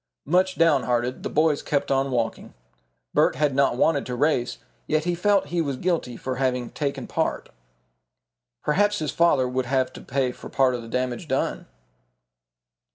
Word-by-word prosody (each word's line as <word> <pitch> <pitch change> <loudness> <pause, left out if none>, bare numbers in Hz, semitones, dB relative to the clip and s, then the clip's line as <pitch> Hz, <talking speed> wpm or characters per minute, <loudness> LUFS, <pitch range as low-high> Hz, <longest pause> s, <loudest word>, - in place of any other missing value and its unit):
Much 185 +4 +2
downhearted 125 -6 +2
the - - -4
boys 155 -1 +2
kept 145 -1 -1
on 135 0 +2
walking. 115 - -2 0.6
Bert - - +3
had 145 0 +1
not 135 -2 +2
wanted 145 +1 +2
to 125 - -3
race, 130 -2 +1 0.3
yet 155 0 +1
he 175 +1 0
felt 200 +3 +2
he 170 - +2
was 140 -4 -2
guilty 160 -8 -1
for 130 -1 -4
having 125 -2 -1
taken 140 -2 -3
part. - - -2 1.1
Perhaps 205 +7 +2
his 155 -6 -2
father 170 -7 +3
would 125 0 -2
have 130 0 0
to - - -10
pay 130 -1 -1
for - - -11
part 130 -2 +2
of 120 - -3
the 115 - -10
damage 125 +5 -2
done. 135 -2 -1
135 Hz, 165 wpm, -24 LUFS, 125-160 Hz, 1.1 s, Bert